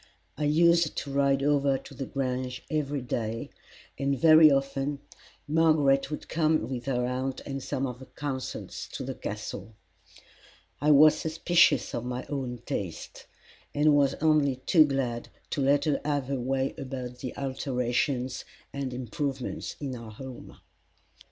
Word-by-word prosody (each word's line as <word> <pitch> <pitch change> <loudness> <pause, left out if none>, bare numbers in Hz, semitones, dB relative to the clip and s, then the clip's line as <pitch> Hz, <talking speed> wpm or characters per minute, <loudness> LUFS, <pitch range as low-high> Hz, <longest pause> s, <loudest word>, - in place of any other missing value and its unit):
I 150 +4 -2
used 170 +2 +4
to 140 - -4
ride 140 -1 +2
over 140 -1 +3
to 135 - -12
the 135 0 -5
Grange 130 -1 -3
every 145 -3 -1
day, 115 -2 -3 0.5
and 140 0 0
very 155 +1 +8
often 135 +1 0 0.5
Margaret 150 -3 +3
would 150 - -6
come 155 -1 +1
with 125 -2 -5
her 125 -2 0
aunt 130 +1 -2
and 135 -1 -5
some 135 0 -2
of 125 -2 -5
her 130 - -11
consuls 135 -3 -5
to - - -4
the - - -4
Castle. 110 - -6 1.1
I 150 - +2
was 150 +1 +8
suspicious 160 -3 +3
of 120 - -2
my 125 +1 -4
own 125 -4 -4
taste, 90 -5 -5 0.5
and 150 +1 +4
was 140 -1 +3
only 155 -4 +3
too 155 +5 +4
glad 130 -4 -2 0.2
to 145 - -1
let 140 +3 +3
her 150 -2 +1
have 145 -3 -1
her 135 -2 -1
way 135 +2 -1
about 130 -2 -6
the 130 - -6
alterations 130 -1 -1 0.3
and 135 -3 -3
improvements 130 +2 -4
in 135 -3 -4
our 115 -2 -9
home. 130 +2 -10
135 Hz, 150 wpm, -28 LUFS, 125-145 Hz, 1.1 s, very